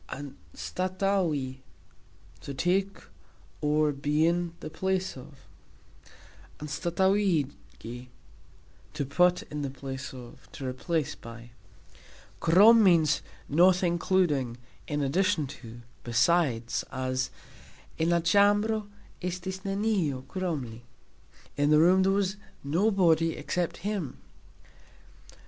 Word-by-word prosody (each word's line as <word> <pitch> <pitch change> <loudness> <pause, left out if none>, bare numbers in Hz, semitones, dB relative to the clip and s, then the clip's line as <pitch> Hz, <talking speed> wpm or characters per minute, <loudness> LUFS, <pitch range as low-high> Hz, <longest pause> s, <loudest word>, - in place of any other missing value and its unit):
"Anstatauxi", 150 - -2 0.8
to 140 - -6
take 190 +6 0 0.6
(or, 150 0 +2
be 145 +2 +1
in) 170 0 0
the - - -7
place 190 +3 -1
of; 135 +1 -13 1.1
"anstatauxigi", 160 - -1 0.9
to 140 - -2
put 180 +6 +2
in 150 0 -6
the 140 - -2
place 135 -1 -7
of, 125 -2 -12
to 135 - -7
replace 150 +3 -2
(by). 115 +1 -12 0.9
"Krom" 210 +7 +7
means 170 -5 +4 0.3
"not 180 +5 +4
including, 170 -8 +1 0.3
in 145 -1 -1
addition 175 +3 +1
to, 120 -3 -10 0.2
besides", 120 -1 +1
as 130 0 -2 0.7
"En 160 +1 +2
la 170 0 +3
cxambro 205 +4 +3 0.3
estis 180 +1 -4
neniu 195 -10 -1
krom 180 -7 -2
li", 115 -1 -10 0.8
In 145 +1 +2
the 150 - +6
room 180 +4 +5
there 190 +1 +3
was 200 0 0 0.3
nobody 165 0 +2
except 175 -2 -2
him. 200 -10 -3
165 Hz, 100 wpm, -28 LUFS, 135-185 Hz, 1.1 s, Krom